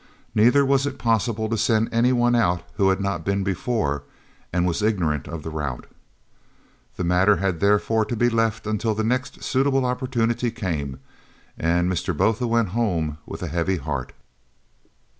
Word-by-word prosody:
Neither 125 +6 +5
was 135 +1 +2
it 140 - -5
possible 115 -1 0
to 115 0 -1
send 110 0 +2
any 120 +2 +3
one 120 -1 +3
out 90 -7 +2
who 100 -2 +4
had 95 - +1
not 100 -4 -2
been 100 +2 0
before 95 - -1 0.5
and 90 0 +1
was 90 +3 0
ignorant 85 - 0
of 85 -2 -6
the 80 - -5
route. 75 -5 -4 1.1
The 90 - -3
matter 90 +4 +4
had 95 -4 -1
therefore 105 +2 +2
to 120 - -3
be 120 +2 +2
left 115 -2 0
until 110 +1 -1
the 110 - -1
next 125 +3 -2
suitable 135 0 +1
opportunity 125 -2 0
came 80 - -4 0.6
and 85 +2 +1
Mr. 90 -2 -2
Botha 115 +3 +1
went 115 -3 +1
home 85 -8 -1
with - - -7
a - - -2
heavy 85 +4 0
heart. 70 -4 -4
105 Hz, 165 wpm, -23 LUFS, 85-115 Hz, 1.1 s, Neither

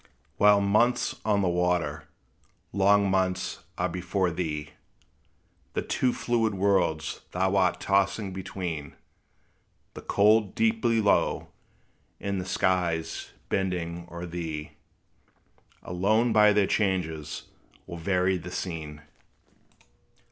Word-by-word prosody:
While 105 0 +6
months 115 +5 +2
on 105 -2 +2
the - - +2
waters, 90 0 0 0.7
long 100 +1 +4
months 95 -1 0 0.2
are - - +1
before 90 +1 -1
thee, 75 -3 -3 1.0
The - - 0
two 125 - +1
fluid 115 -4 0
worlds 95 -5 +1
thou 95 +2 +1
art 95 -2 +2
tossing 100 0 +1
between 90 -6 -5 1.0
The - - -9
cold 105 0 +3
deep 225 0 +1
below, 110 -3 +2 0.7
and 100 -1 -2
the 90 - -7
skies 85 -3 0 0.2
bending 85 -2 -2
o'er 85 +1 -6
thee, 80 -3 -5 1.1
Alone 110 +6 +1
by 105 -1 +6
their 105 -1 +3
changes 85 -8 -1 0.4
will 85 - -7
vary 90 +2 +1
the 90 0 -8
scene. 80 -5 -5
95 Hz, 105 wpm, -27 LUFS, 85-100 Hz, 1.1 s, While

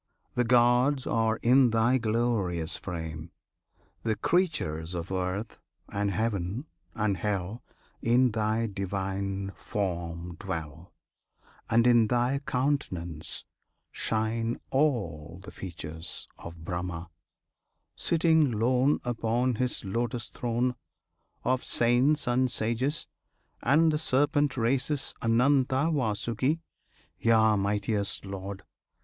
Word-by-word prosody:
The 125 - +2
gods 125 +3 +4
are 110 -1 +1
in 125 +1 +6
Thy 115 +3 +3
glorious 110 -8 0
frame! 80 -2 -6 0.7
the 110 -1 0
creatures 90 - 0
Of 85 +2 -4
earth, 95 +4 -3 0.3
and 100 0 -1
heaven, 105 - -1 0.3
and 105 -3 0
hell 100 +3 -2 0.4
In 125 +2 +4
Thy 110 +1 0
Divine 100 -1 -3
form 85 -3 -4
dwell, 80 -4 -6 0.8
And 115 +1 +4
in 120 -2 +5
Thy 125 +4 +1
countenance 90 - -1 0.5
shine 115 +1 -1
all 90 - 0
the - - -9
features 80 -2 -6
Of 85 -1 -10
Brahma, 85 -1 -4 0.8
sitting 160 -3 +3
lone 125 +5 +2
Upon 120 +1 0
His 125 -3 -1
lotus 120 +3 -2
throne; 120 +1 -1 0.7
Of 130 0 +1
saints 125 +6 +2
and 125 +1 +2
sages, 120 +7 -1 0.6
and 155 +6 +4
the 150 - +1
serpent 145 -1 +2
races 135 +4 +1
Ananta, 130 +5 +3
Vasuki; 120 +3 0 0.6
Yea! 110 -1 +4
mightiest 100 0 -1
Lord! 95 0 -6
115 Hz, 100 wpm, -28 LUFS, 95-125 Hz, 0.8 s, in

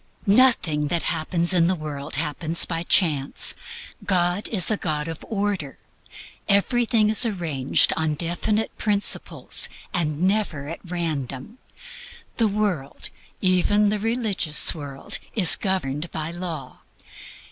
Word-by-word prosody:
Nothing 200 - +3
that 170 +3 -1
happens 170 +2 0
in 170 -2 +4
the 185 - +1
world 150 -3 -6
happens 160 +2 +2
by 165 -1 -3
chance. 155 -6 +2 0.5
God 180 +1 0
is 205 -2 +2
a - - +2
God 150 -4 -3
of 165 -1 -7
order. 200 - -2 0.7
Everything 225 +2 +3
is 220 - +6
arranged 165 - +1
upon 160 -1 -1
definite 175 +7 -1
principles, 205 -1 +1 0.2
and 160 -3 -1
never 185 -8 0
at 165 - -6
random. 165 - -4 0.8
The 230 - +3
world, 195 -9 -2 0.3
even 205 +3 +3
the 210 0 -1
religious 215 -8 +1
world, 140 -4 -4 0.2
is 185 -7 +7
governed 170 -5 -2
by 155 +1 -4
law. 170 -4 -7
175 Hz, 120 wpm, -23 LUFS, 155-205 Hz, 0.8 s, is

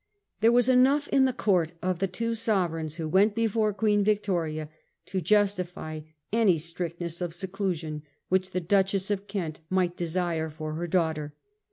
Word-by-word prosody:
There 225 +2 +5
was 245 0 +4
enough 260 +3 +4
in 270 -1 +4
the 260 - +2
court 180 -9 +1
of 185 -1 -1
the 195 - +1
two 230 +5 -2
sovereigns 175 -9 -1
who 165 -2 -3
went 200 +6 +3
before 225 -1 +1
Queen 205 0 +2
Victoria 175 -7 0 0.4
to 190 -1 -3
justify 180 -4 0 0.3
any 215 -7 +4
strictness 170 +1 -4
of 175 -2 -3
seclusion 180 -5 -3 0.3
which 185 0 +1
the 185 -1 -2
Duchess 195 +2 +1
of 200 0 -2
Kent 175 -6 -4
might 185 -2 +1
de 175 - -2
sire 165 -2 -1
for 155 0 -6
her 170 +2 -3
daughter. 160 -4 -1
185 Hz, 165 wpm, -27 LUFS, 165-205 Hz, 0.4 s, There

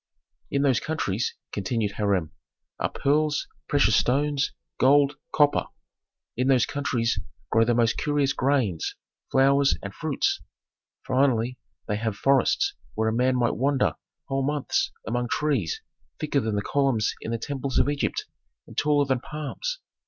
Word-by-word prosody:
"In 140 0 +1
those 130 -5 +3
countries," 120 -9 -2 0.2
continued 105 +1 -1
Hiram, 100 -6 0 0.5
"are - - 0
pearls, 150 +2 +1 0.2
precious 135 -7 +4
stones, 145 +2 +2 0.3
gold, 140 +1 +5 0.2
copper; 145 -1 +3 0.7
in 125 +2 0
those 130 -4 +4
countries 125 -5 -1 0.3
grow 115 0 +4
the 120 0 +2
most 115 -1 +2
curious 145 -2 +1
grains, 130 - 0 0.4
flowers, 140 +1 +4
and 100 -1 -6
fruits; 155 +2 -1 0.6
finally 125 -2 +1 0.3
they 105 - 0
have 110 -1 -2
forests 140 - +3 0.2
where 110 +1 +1
a - - -1
man 125 +2 +2
might 120 -2 +1
wander 135 +2 +2 0.3
whole 135 0 -1
months 145 0 0
among 120 +1 -1
trees 135 - -1 0.4
thicker 150 -2 +1
than 110 -4 -1
the 100 - -1
columns 135 -5 +1
in - - -5
the 115 - -1
temples 135 +2 -3
of - - +4
Egypt 145 0 -1 0.4
and - - -14
taller 145 -1 +3
than 130 -2 +1
palms. 155 - -5
135 Hz, 145 wpm, -26 LUFS, 115-145 Hz, 0.7 s, gold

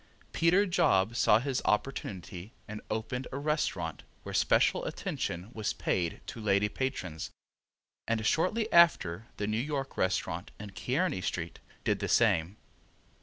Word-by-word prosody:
Peter 180 +5 +4
Job 110 - +2
saw 105 - +5
his 130 +2 -1
opportunity 100 -4 -2
and 105 0 -6
opened 115 +4 -3
a 135 - -4
restaurant 150 +2 -1 0.2
where - - -7
special - - +3
attention 90 +6 -4
was 110 -2 -2
paid 85 -2 -1
to 115 - -7
lady 100 -1 +3
patrons, 105 - -3 0.8
and 115 -1 0
shortly 200 - +2
after 115 - +4
the 105 - -1
New 110 +1 -1
York 135 0 -3
restaurant, 90 -1 -1
in 105 -1 -8
Kearny 135 - -1
street, 85 -2 -3 0.2
did - - +1
the - - -2
same. 85 +5 +3
110 Hz, 135 wpm, -30 LUFS, 95-135 Hz, 0.8 s, saw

